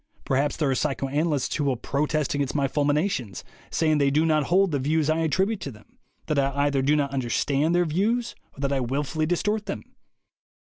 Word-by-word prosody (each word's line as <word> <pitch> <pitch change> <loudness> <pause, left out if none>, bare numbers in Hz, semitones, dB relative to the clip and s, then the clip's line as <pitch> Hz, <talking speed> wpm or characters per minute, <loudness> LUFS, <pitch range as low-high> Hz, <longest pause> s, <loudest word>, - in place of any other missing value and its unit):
Perhaps 140 +1 0
there 150 -4 +1
are - - +2
psychoanalysts 145 +1 -1
who 150 - 0
will 135 -2 +1
protest 150 +4 -1
against 140 -1 -1
my 140 -2 +2
fulminations, 145 - -1 0.3
saying 155 -2 +1
they 140 -1 +3
do 150 +3 +2
not 155 -2 +2
hold 190 +3 +3
the 145 - 0
views 155 +3 +1
I 160 - +1
attribute 190 +6 +1
to 140 - -5
them, 105 -3 -19 0.3
that 150 - 0
I 135 0 +1
either 140 -2 +1
do 145 +3 +3
not 140 -2 0
understand 140 +5 +1
their 175 0 +3
views 215 +9 0 0.2
or - - -8
that 140 0 0
I 135 - +1
wil 130 +4 -1
fully 155 +2 -2
distort 210 +5 -1
them. 195 - -4
150 Hz, 205 wpm, -25 LUFS, 140-160 Hz, 0.3 s, they